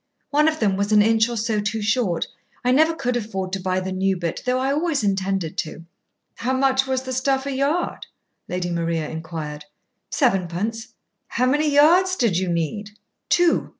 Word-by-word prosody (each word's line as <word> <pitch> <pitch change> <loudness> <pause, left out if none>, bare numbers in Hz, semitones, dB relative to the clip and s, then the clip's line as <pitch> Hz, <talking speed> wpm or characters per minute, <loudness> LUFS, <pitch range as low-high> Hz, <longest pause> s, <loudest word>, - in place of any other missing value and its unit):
One 300 +1 +4
of 315 0 0
them 200 -4 +1
was 200 +1 -1
an 210 -1 +6
inch 225 +1 +3
or 235 - -3
so 220 0 0
too 210 +1 -2
short. 210 -6 +1 0.4
I 250 - +4
never 315 +5 +4
could 250 -4 -1
afford 195 -5 -3
to 195 - -1
buy 185 0 0
the 190 0 -4
new 190 0 0
bit, 170 -2 -3
though 250 0 +2
I 265 +1 0
always 295 -3 0
intended 195 -3 -1
to." 165 -1 -5 0.5
"How 255 +3 -1
much 265 0 +2
was 260 -1 -1
the 260 0 -4
stuff 265 +1 0
a 280 - -2
yard?" 280 +6 -1 0.4
Lady 180 -1 -3
Maria 165 -2 -1
inquired. 160 -2 -6 0.4
"Sevenpence." 215 - 0 0.4
"How 250 - 0
many 295 +4 +2
yards 345 +6 +5
did 230 - +1
you 185 +1 0
need?" 205 +6 -3 0.3
"Two. 350 -1 +3
220 Hz, 185 wpm, -22 LUFS, 185-265 Hz, 0.5 s, an